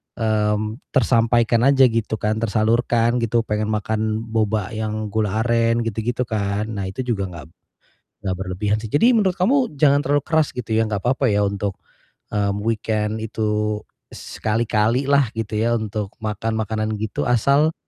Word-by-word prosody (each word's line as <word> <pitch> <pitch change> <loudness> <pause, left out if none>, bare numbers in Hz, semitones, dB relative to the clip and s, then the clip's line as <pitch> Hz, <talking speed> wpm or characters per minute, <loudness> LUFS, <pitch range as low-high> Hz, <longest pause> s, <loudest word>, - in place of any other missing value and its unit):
mmm, 110 0 0 0.2
tersampaikan 115 -2 +3
aja 135 -1 +5
gitu 115 -1 -1
kan, 110 +1 0
tersalurkan 115 +2 +1
gitu 115 0 +1
pengen 105 -1 -2
makan 110 +1 -1
boba 110 -3 -1
yang 110 -1 -3
gula 110 0 0
aren 115 0 +2
gitu 115 -1 -3
gitu 120 +2 -1
kan. 105 -1 -1
Nah 100 -3 -3
itu 95 +7 -4
juga 100 -5 -1
gak 80 -5 -9 0.8
gak 95 -1 0
berlebihan 95 +3 -1
sih. 110 - -6
Jadi 230 +13 +5
menurut 195 -4 +2
kamu 235 - +1
jangan 140 0 +4
terlalu 145 +1 +2
keras 160 -2 +2
gitu 120 -3 -4
ya, 110 - +3
nggak 100 -2 -3
papa 130 +2 +2
ya 105 0 +2
untuk, 100 -1 -2 0.6
mmm, 100 -1 +1
weekend 110 -1 -1
itu 105 -1 -1 0.3
sekali-kali 110 +3 0
lah 140 -2 +4
gitu 110 -2 -4
ya, 115 +2 +1
untuk 105 -2 -4
makan 110 +1 -2
makanan 110 0 -2
gitu 110 -2 -2
asal 140 +6 +3
110 Hz, 160 wpm, -21 LUFS, 105-120 Hz, 0.8 s, aja